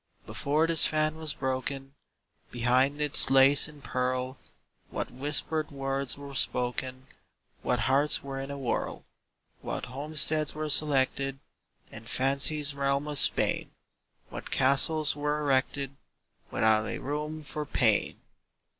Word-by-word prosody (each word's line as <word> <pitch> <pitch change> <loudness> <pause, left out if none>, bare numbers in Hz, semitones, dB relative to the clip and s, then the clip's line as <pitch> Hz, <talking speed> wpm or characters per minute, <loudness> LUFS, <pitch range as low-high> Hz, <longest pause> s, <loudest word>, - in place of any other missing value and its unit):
Before 150 +3 0
this 165 -1 +5
fan 155 0 0
was 160 -2 -3
broken, 135 +1 -4 0.6
Behind 130 +4 +1
its 150 -1 +5
lace 135 +2 +5
and 150 -2 -15
pearl 130 +1 -2 0.5
What - - -4
whispered 150 +3 0
words 135 -2 -2
were 140 -1 -10
spoken 130 0 -1 0.6
What 125 -1 -1
hearts 135 +4 +1
were 135 -1 -6
in 135 - -7
a 140 - -5
whirl! 130 -4 -3 0.6
What - - -5
homesteads 150 +2 +1
were 155 0 -3
selected 135 -2 +1 0.5
In - - -11
Fancy's 140 +3 +2
realm 140 +1 -1
of 150 -1 0
Spain! - - +2 0.6
What - - -8
castles 140 +3 +2
were 150 +1 -1
erected, 140 -1 -1 0.5
Without 110 0 +2
a - - -4
room 150 +2 -4
for 150 +1 -3
pain! 120 -7 0
140 Hz, 125 wpm, -28 LUFS, 130-150 Hz, 0.6 s, this